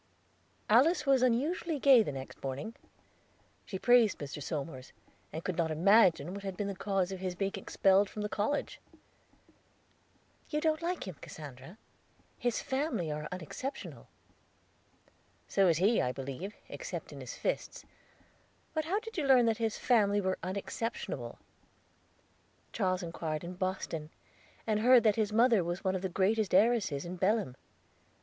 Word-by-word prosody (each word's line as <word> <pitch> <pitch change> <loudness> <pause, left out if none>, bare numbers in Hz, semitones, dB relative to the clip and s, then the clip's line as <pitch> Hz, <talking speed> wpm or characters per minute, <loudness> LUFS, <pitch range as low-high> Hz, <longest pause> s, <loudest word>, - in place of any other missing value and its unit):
Alice 295 +8 +4
was 270 -2 +4
unusually 295 +7 +1
gay 270 -3 +7
the 210 - -2
next 135 -1 -8
morning. 135 - -4 0.9
She 190 - -4
praised 240 -1 +4
Mr. 145 0 -6
Somers, 140 -3 -5 0.4
and 160 +2 -6
could 185 -3 -3
not 165 -2 +1
imagine 175 -1 +4
what 200 - -6
had 195 -2 -5
been 205 - -2
the 200 - -3
cause 195 -1 -1
of 190 - -5
his 185 -1 -3
being 195 +2 -1
expelled 195 +1 +2
from 210 - -5
the - - -1
college. 210 +8 -2 1.7
"Don't 310 +1 0
you 335 - -2
like 360 - -3
him, 180 -6 -7
Cassandra? 145 - -10 0.6
His 245 -2 -1
family 265 - -1
are 150 0 -4
unexceptionable." 185 - -6 1.4
"So 195 -1 +3
is 165 -3 +3
he, 205 +7 +3
I 125 - 0
believe, 140 +10 -6
except - - -6
in - - -9
his - - -7
fists. - - -3 0.9
But 315 -1 -1
how 380 +6 0
did 450 -2 -9
you 285 - -1
learn 255 -3 +6
that 225 -1 +2
his 225 -2 -1
family 205 -4 +3
were 190 -1 -1
unexceptionable?" 200 +5 -4 1.4
"Charles 185 -4 0
inquired 165 -2 -4
in 175 +1 -6
Boston, 180 -4 -3 0.6
and 215 -1 +1
heard 245 +2 +6
that 215 -3 +4
his 215 -2 0
mother 230 -3 +4
was 175 +2 -4
one 190 -1 +1
of 190 - -2
the 190 - -2
greatest 195 +3 +1
heiresses 200 -9 +3
in 180 +1 -6
Belem." 195 - +1
200 Hz, 155 wpm, -31 LUFS, 175-240 Hz, 1.7 s, gay